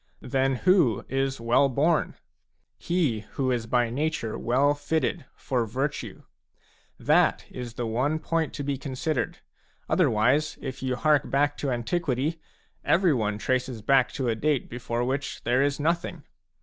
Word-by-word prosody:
Then 135 0 +1
who 165 - +3
is 135 0 -1
well 120 +4 +3
born? 150 +5 +1
_J - - -36
He 160 -11 +1
who 130 -2 0
is 120 -3 -1
by 120 0 +1
nature 140 -4 -2
well 135 +4 +2
fitted 145 -2 -1
for 125 -3 -1
virtue. 135 +6 -3 0.8
That - - +3
is 120 -2 -7
the 120 - -3
one 130 +7 0
point 165 0 -1
to 145 - -4
be 140 -1 -2
considered; 130 -2 -2 0.5
otherwise, 130 +8 +2
if 130 0 -6
you 130 -1 -1
hark 150 +1 +2
back 145 +1 +2
to 140 - -2
antiquity, 140 +4 -1 0.4
every 175 -3 +3
one 105 -4 -1
traces 125 -1 -2
back 135 0 +3
to 130 - -2
a 115 - +2
date 140 +4 0
before 120 0 -2
which 135 +3 -3
there 125 +3 +2
is 140 0 +1
nothing. 170 0 -1
135 Hz, 150 wpm, -26 LUFS, 120-150 Hz, 0.8 s, who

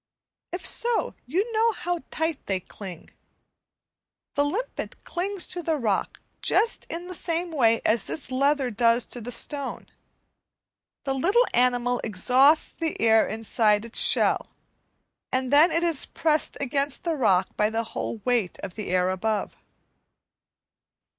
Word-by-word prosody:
If 360 - -5
so, 475 0 0
you 385 - -1
know 450 +1 +3
how 350 -2 -3
tight 320 -2 -3
they 190 -2 0
cling. 185 -2 -10 1.2
the 285 - +2
limpet 410 +13 -4
clings 375 +2 -2
to 355 - -2
the 325 -1 0
rock 220 -9 -1 0.2
just 465 - +1
in 340 +1 -5
the 365 - -7
same 340 0 -3
way 230 -7 +3
as 215 -2 +2
this 150 - -5
leather 275 0 +1
does 230 +2 +2
to 245 - -5
the 240 +3 -6
stone; 280 +1 -2 1.2
the 270 - -1
little 390 - +3
animal 245 0 +2
exhausts 255 - +3
the 325 -1 -4
air 225 -1 +4
inside 220 -1 +1
it's 230 - +1
shell, - - +3 0.8
and 260 +1 -1
then 305 +4 +7
it 335 0 +1
is 335 -5 +1
pressed 310 -1 0
against 280 +2 -1
the 335 -2 0
rock 195 -10 +1
by 210 0 +2
the 225 +1 -1
whole 230 0 -5
weight 240 -7 0
of 190 - -6
the 210 +1 -6
air 180 0 +2
above. 210 +3 -2
260 Hz, 145 wpm, -25 LUFS, 225-330 Hz, 1.2 s, then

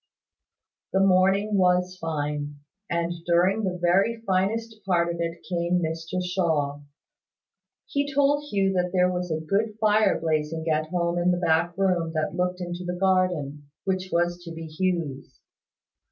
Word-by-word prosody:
The 190 - +3
morning 195 +2 +3
was 180 0 +2
fine; 150 -2 -3 0.3
and 170 0 -1
during 180 +5 +3
the 185 -2 -1
very 195 +7 +2
finest 215 +4 -1
part 170 -2 +1
of 170 - -5
it 170 0 -4
came 175 0 0
Mr 165 +1 -3
Shaw. 160 -6 0 1.1
He 285 0 -1
told 285 +1 +2
Hugh 195 -7 +1
that 180 -1 0
there 180 -1 +3
was 180 0 -3
a 160 -1 -1
good 210 +5 0
fire 215 -2 +3
blazing 160 0 -1
at 155 0 +1
home 170 0 0
in 175 +1 +2
the 180 - +2
back 170 0 +1
room 180 -4 +1
that 155 -1 -1
looked 180 0 -1
into 175 0 -5
the 180 0 -4
garden, 175 -7 0
which 185 -1 -2
was 175 +1 0
to 170 - -8
be 165 0 -7
Hugh's. 160 -4 -3
180 Hz, 155 wpm, -25 LUFS, 165-190 Hz, 1.1 s, The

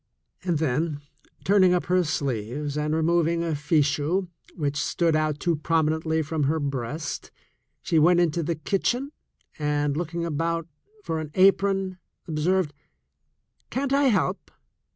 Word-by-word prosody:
And 175 -3 +1
then, 150 +1 -1 0.4
turning 185 -2 +5
up 175 - -1
her 180 0 +3
sleeves 140 -1 -2
and 150 +1 0
removing 170 +1 +2
a 165 -1 -1
fichu 150 +4 +1 0.3
which 145 -3 -1
stood 165 -2 +1
out 155 -1 0
too 170 -2 +1
prominently 160 0 +1
from 155 -1 -1
her 160 +3 +1
breast, 140 +1 -4 0.5
she 165 - +2
went 175 +3 +5
into 170 -1 +2
the 165 +1 -1
kitchen 240 - -1 0.5
and, 145 -1 0
looking 170 +1 -2
about 165 +1 -1 0.4
for 160 - -2
an 155 -1 -5
apron, 195 -1 +3 0.3
observed: 165 +1 +1 1.0
"Can't 275 +1 -1
I 280 0 +4
help? 200 -5 +1
160 Hz, 130 wpm, -25 LUFS, 150-180 Hz, 1.0 s, turning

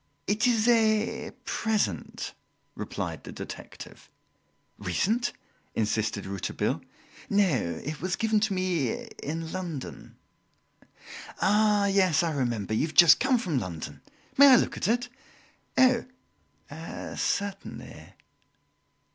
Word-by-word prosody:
"It 210 +5 +2
is 230 -2 +2
a 220 -2 +2 0.2
present," 220 -2 -1 0.4
replied - - -5
the - - -8
detective. - - -10 0.7
"Recent?" 230 +5 0 0.4
insisted 110 -1 -1
Rouletabille. 100 -1 -2 0.5
"No, 170 - +1
it 150 +2 -5
was 185 +1 -1
given 220 -1 +2
to 210 -1 0
me 175 -9 0 0.3
in 160 +2 -4
London." 170 -7 -6 1.2
"Ah, 210 0 +3
yes, 185 -5 +3
I 165 -2 0
remember 120 -7 -1
you 130 +8 +1
have 155 - -11
just 170 +3 +8
come 265 -1 +3
from 175 - -1
London. 85 -7 -6 0.4
May 280 - +10
I 265 - +9
look - - +2
at - - -2
it?" 240 +2 +1 0.7
"Oh! 255 -2 +5 1.1
certainly!" 200 -1 -4
185 Hz, 110 wpm, -27 LUFS, 145-220 Hz, 1.2 s, May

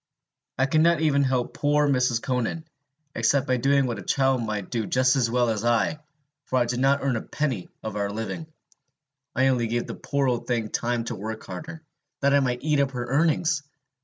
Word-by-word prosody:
I 130 - +3
could 155 +3 +2
not 170 0 +4
even 140 -3 +3
help 130 -2 0
poor 145 0 +2
Mrs. 125 -4 +1
Conan, 130 +5 -2 0.5
except 140 0 +2
by 130 -2 +1
doing 135 +2 +3
what 120 -5 -3
a - - -6
child 135 -2 +1
might 105 -4 -4
do 115 -3 -1
just 130 +1 +3
as 125 -4 +2
well 120 0 +2
as 110 -1 -2
I, 120 +6 +1 0.5
for 130 - 0
I 125 - +3
did 120 +1 -2
not 135 +2 +2
earn 135 -4 +1
a - - -3
penny 130 -11 -3
of 110 -2 -5
our 100 -1 -1
living; 110 +8 -5 0.9
I 130 +1 +3
only 120 -3 +1
gave 120 +1 -1
the - - -6
poor 140 -1 -1
old 120 -2 -1
thing 115 -3 -1
time 120 +1 -1
to 115 - -4
work 110 +3 -6
harder, 160 0 -8 0.4
that 140 0 +3
I 140 - +6
might 125 -2 -1
eat 150 -1 +2
up 140 -1 +1
her 120 -1 -3
earnings! 155 +4 +1
130 Hz, 210 wpm, -25 LUFS, 120-140 Hz, 0.9 s, I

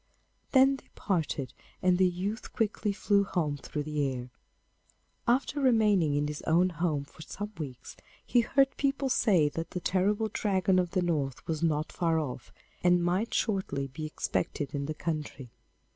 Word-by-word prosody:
Then 270 0 +5
they - - -19
parted, 155 - -1 0.3
and 180 0 +4
the 185 - +6
youth 190 +6 -4
quickly 210 -2 0
flew 200 0 +2
home 160 -7 -1
through 150 +2 -4
the 150 -2 -1
air. 125 -1 -6 1.0
After 270 +4 +1
remaining 210 - +3
in 145 0 +1
his 150 0 -5
own 175 +3 +4
home 155 -3 -1
for 145 - -16
some 205 +6 -6
weeks, 130 -5 -7 0.3
he 240 - +4
heard 270 +3 +2
people 275 -1 0
say 185 -11 +4
that 165 +3 -5
the 180 - -4
terrible 205 +5 +1
Dragon 190 -2 +2
of 180 -1 0
the 185 0 0
North 145 -7 -1
was 160 -1 -2
not 155 -2 0
far 165 -2 +1
off, 130 -6 -4 0.3
and 175 -1 +4
might 185 +6 0
shortly 190 -10 -1
be 155 +4 -5
expected 145 -1 -2
in 140 -1 -2
the 155 - -3
country. 150 -7 -4
175 Hz, 165 wpm, -29 LUFS, 150-205 Hz, 1.0 s, the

